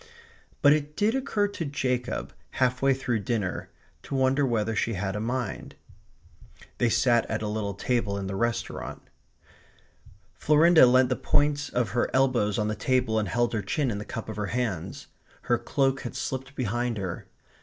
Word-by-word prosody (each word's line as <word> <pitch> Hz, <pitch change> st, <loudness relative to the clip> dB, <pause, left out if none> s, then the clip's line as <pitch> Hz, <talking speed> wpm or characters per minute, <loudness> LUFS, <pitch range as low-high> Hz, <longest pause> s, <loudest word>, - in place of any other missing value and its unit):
But 145 Hz, 0 st, +8 dB
it 150 Hz, 0 st, -2 dB
did 210 Hz, +2 st, +2 dB
occur 255 Hz, -6 st, 0 dB
to 200 Hz, -4 st, -5 dB
Jacob, 130 Hz, -4 st, -2 dB, 0.2 s
half 130 Hz, 0 st, +1 dB
way 135 Hz, 0 st, +4 dB
through 125 Hz, -4 st, -1 dB
dinner, 100 Hz, -2 st, -2 dB, 0.3 s
to -, -, -6 dB
wonder 135 Hz, +1 st, +2 dB
whether 115 Hz, -2 st, 0 dB
she 115 Hz, +2 st, 0 dB
had 95 Hz, 0 st, -3 dB
a -, -, -2 dB
mind. 120 Hz, -1 st, -3 dB, 1.0 s
They 120 Hz, -, +3 dB
sat 120 Hz, 0 st, +2 dB
at 110 Hz, 0 st, -2 dB
a -, -, -2 dB
little 105 Hz, -2 st, -3 dB
table 105 Hz, -2 st, -1 dB
in 100 Hz, -, -4 dB
the 95 Hz, 0 st, -4 dB
restaurant. 120 Hz, +2 st, -3 dB, 1.3 s
Florinda 155 Hz, -1 st, +6 dB
leant 130 Hz, 0 st, +4 dB
the 125 Hz, -, +1 dB
points 145 Hz, +2 st, +1 dB
of 120 Hz, -2 st, 0 dB
her 120 Hz, -, 0 dB
elbows 125 Hz, -6 st, +2 dB
on 105 Hz, -2 st, 0 dB
the 110 Hz, -, -1 dB
table 125 Hz, -1 st, +1 dB
and 105 Hz, -4 st, -2 dB
held 120 Hz, +6 st, +1 dB
her 110 Hz, -, 0 dB
chin 125 Hz, +6 st, -1 dB
in 100 Hz, -, -3 dB
the -, -, -5 dB
cup 115 Hz, -, -6 dB
of 110 Hz, -, -6 dB
her 105 Hz, -1 st, -2 dB
hands. 115 Hz, -9 st, -3 dB, 0.4 s
Her -, -, +1 dB
cloak 135 Hz, -1 st, 0 dB
had 120 Hz, -, -6 dB
slipped 135 Hz, +1 st, -4 dB
behind 120 Hz, -1 st, -1 dB
her. 95 Hz, -4 st, -5 dB
120 Hz, 175 wpm, -27 LUFS, 105-135 Hz, 1.3 s, But